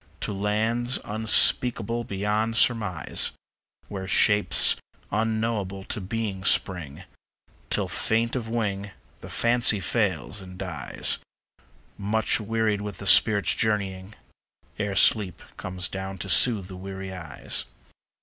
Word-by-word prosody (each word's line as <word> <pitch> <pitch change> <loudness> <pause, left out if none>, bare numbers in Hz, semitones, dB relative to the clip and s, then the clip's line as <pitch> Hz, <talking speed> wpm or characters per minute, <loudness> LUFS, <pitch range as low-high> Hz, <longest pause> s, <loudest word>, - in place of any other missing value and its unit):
To 105 - -3
lands 110 +5 -1
unspeakable 115 +1 +2
beyond 105 +3 -1
surmise, 105 -10 +1 0.5
Where 95 -2 -6
shapes 105 +2 +4 0.4
unknowable 110 -3 -2
to 105 - -4
being 100 -1 -4
spring, 90 -8 +1 0.7
Till, - - 0
faint 115 +2 0
of 115 -3 -4
wing, 105 -4 -2 0.3
the - - -11
Fancy 120 -3 +3
fails 95 - -1
and 90 -1 -11
dies 90 -5 -1 0.8
Much 110 +4 +1
wearied 110 -1 -1
with 105 -3 -6
the 100 - -8
spirit's 100 0 +5
journeying, 100 -2 -2 0.6
Ere 105 -2 -2
sleep 95 0 +4
comes 90 -1 -4
down 95 0 -6
to 95 +1 -6
soothe 105 0 +5
the 95 - -9
weary 95 0 -7
eyes. 80 -7 -3
105 Hz, 115 wpm, -25 LUFS, 95-110 Hz, 0.8 s, spirit's